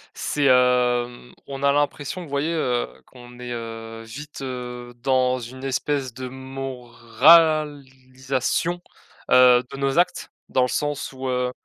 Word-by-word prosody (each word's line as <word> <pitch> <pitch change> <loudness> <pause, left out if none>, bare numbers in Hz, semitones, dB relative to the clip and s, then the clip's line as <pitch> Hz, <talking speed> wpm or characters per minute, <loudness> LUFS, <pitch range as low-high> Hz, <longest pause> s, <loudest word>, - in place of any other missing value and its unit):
c'est, 145 -1 -1
hem, 125 -1 +2
on 135 0 -7
a 140 0 +4
l'impression, 145 +4 -1
vous 155 - -11
voyez, 140 +4 -1
heu, 125 -6 0 0.2
qu'on 120 -1 -15
est, 125 0 -7
heu, 115 -1 -7
vite, 140 +7 -9
heu, 125 -2 -6
dans 130 -1 +2
une 130 +2 -9
espèce 135 -1 -2
de 130 0 -6
moralisation, 130 +3 +1 0.5
heu, 125 -1 +7
de - - -7
nos 135 +4 +1
actes, 175 - 0 0.2
dans 130 - +2
le 125 - +2
sens 145 -2 -2
où, 130 0 -6
heu 125 0 0
130 Hz, 140 wpm, -23 LUFS, 125-140 Hz, 0.5 s, heu